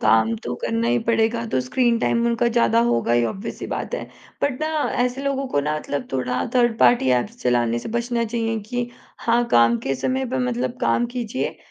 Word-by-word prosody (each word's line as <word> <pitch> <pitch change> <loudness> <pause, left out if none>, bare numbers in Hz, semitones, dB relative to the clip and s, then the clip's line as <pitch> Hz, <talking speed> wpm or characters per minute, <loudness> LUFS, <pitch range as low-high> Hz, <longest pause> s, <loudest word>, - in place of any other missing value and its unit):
काम 110 +1 +3
तो 125 +3 -5
करना 115 0 0
ही 120 0 +3
पड़ेगा 230 0 +1
तो - - +2
स्क्रीन 250 -2 +1
टाइम 235 0 +1
उनका 235 0 +2
ज़्यादा 235 -1 +3
होगा 115 - +1
ही 120 0 +3
ऑब्वियस 195 - -5
ही - - -4
बात - - -4
है। - - -4 0.4
बट 285 -2 0
ना 310 - 0 0.4
ऐसे 250 +2 -3
लोगों 275 -1 -1
को 145 - +1
ना 150 +2 -1
मतलब 145 -3 -4
थोड़ा 125 -1 -1
थर्ड 240 -2 +3
पार्टी 235 - +4
ऐप्स 230 - -6
चलाने 120 -1 +2
से - - -7
बचना 235 +1 -1
चाहिए 225 0 -1
कि 240 +3 -4 0.3
हाँ, 235 +1 +2
काम 115 0 +4
के 135 - -2
समय 260 - -1
पे - - -1
मतलब 125 0 -2
काम 115 - +2
कीजिए। 245 0 -3
225 Hz, 205 wpm, -22 LUFS, -, 0.4 s, पार्टी